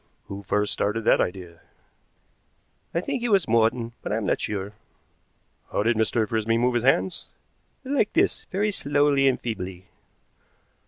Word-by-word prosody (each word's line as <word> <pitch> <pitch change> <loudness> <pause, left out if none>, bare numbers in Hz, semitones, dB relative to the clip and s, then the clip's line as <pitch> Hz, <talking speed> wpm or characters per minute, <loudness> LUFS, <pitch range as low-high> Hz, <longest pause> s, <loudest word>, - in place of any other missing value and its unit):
"Who 100 0 -6
first 105 +1 0
started 110 +2 -1
that - - +4
idea?" 90 -2 -4 1.3
"I 170 - -1
think 265 +5 -3
it 240 - -1
was 195 -5 +3
Morton, 115 +1 +2
but - - -5
I 105 - +1
am 110 - -2
not - - 0
sure." 100 -1 -3 1.0
"How - - 0
did 115 +2 +2
Mr. 110 0 +1
Frisby 115 +1 0
move 125 +2 +2
his 120 -1 0
hands?" 95 -8 +1 0.6
"Like 265 -5 0
this, - - +1
very 205 +3 -1
slowly 145 -4 +2
and 130 - +2
feebly." 95 -5 -6
115 Hz, 155 wpm, -25 LUFS, 105-140 Hz, 1.3 s, that